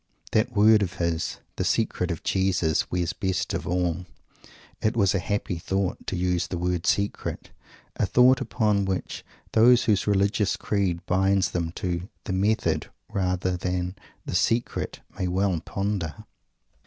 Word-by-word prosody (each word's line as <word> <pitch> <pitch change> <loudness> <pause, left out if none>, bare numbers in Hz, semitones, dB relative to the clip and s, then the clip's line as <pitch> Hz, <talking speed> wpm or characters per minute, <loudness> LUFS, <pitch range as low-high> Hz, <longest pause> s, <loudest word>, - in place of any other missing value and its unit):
That 110 +3 +2
word 105 +1 +6
of 95 -2 -1
his, 85 -2 -1 0.2
"the - - 0
Secret - - 0
of - - -4
Jesus," 90 -5 +1
wears 90 -1 -1
best 95 -2 -2
of - - -3
all. 90 0 -1 0.7
It 110 +2 0
was 100 -4 +3
a 100 - +1
happy 100 -2 -2
thought 95 +2 -2
to - - -2
use 90 -1 0
the 90 - -4
word 90 0 -1
"secret" 100 0 -1 0.5
a 105 - +1
thought 125 +5 +5
upon 105 -4 +1
which 95 -1 -3 0.3
those 120 +2 +6
whose 105 -2 +1
religious 100 +1 +2
creed 95 -5 -1
binds 95 +1 +2
them 85 -2 -2
to 90 0 -3
"the 95 - -3
method" 105 +4 +1 0.2
rather 95 -3 0
than 90 0 -2 0.3
"the - - -4
secret," 115 +6 0 0.2
may 90 - 0
well 95 -1 +1
ponder! 95 -3 -3
95 Hz, 150 wpm, -26 LUFS, 90-100 Hz, 0.7 s, word